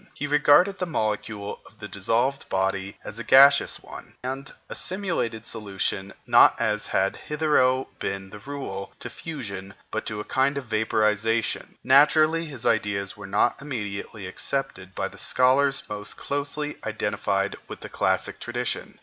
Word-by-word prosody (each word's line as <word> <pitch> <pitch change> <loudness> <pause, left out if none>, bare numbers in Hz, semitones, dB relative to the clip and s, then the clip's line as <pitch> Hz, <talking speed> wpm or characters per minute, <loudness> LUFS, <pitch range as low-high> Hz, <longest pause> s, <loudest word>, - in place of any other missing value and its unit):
He 145 - -3
regarded 150 +6 +4
the 180 - -1
molecule 105 -6 -2
of 105 - -19
the 105 - -7
dissolved 115 +7 0
body 95 0 -1
as 110 - -7
a - - -4
gaseous 140 +2 +6
one, - - -11
and 135 +2 -4 0.2
assimilated 170 - -2
solution, 100 -3 -3
not - - +6
as 105 -1 0
had 95 +1 +1
hitherto 145 -4 +2
been 95 0 -4
the 105 - -9
rule, 110 -6 -6
to - - -7
fusion, 100 - -7 0.2
but 110 - -3
to 110 -2 -3
a - - -3
kind 135 +4 +1
of 140 - -4
vaporization. 110 0 0
Naturally 155 +4 +5
his 140 -7 -8
ideas 100 -3 0
were 100 -2 -9
not 95 - +1
immediately 105 -6 -5
accepted 95 -1 -3
by - - -1
the - - -13
scholars 135 +2 +3
most 105 0 -5
closely 145 +1 -3
identified 100 -2 -1
with - - -9
the - - -7
classic - - 0
tradition. - - -3
115 Hz, 150 wpm, -25 LUFS, 100-140 Hz, 0.2 s, gaseous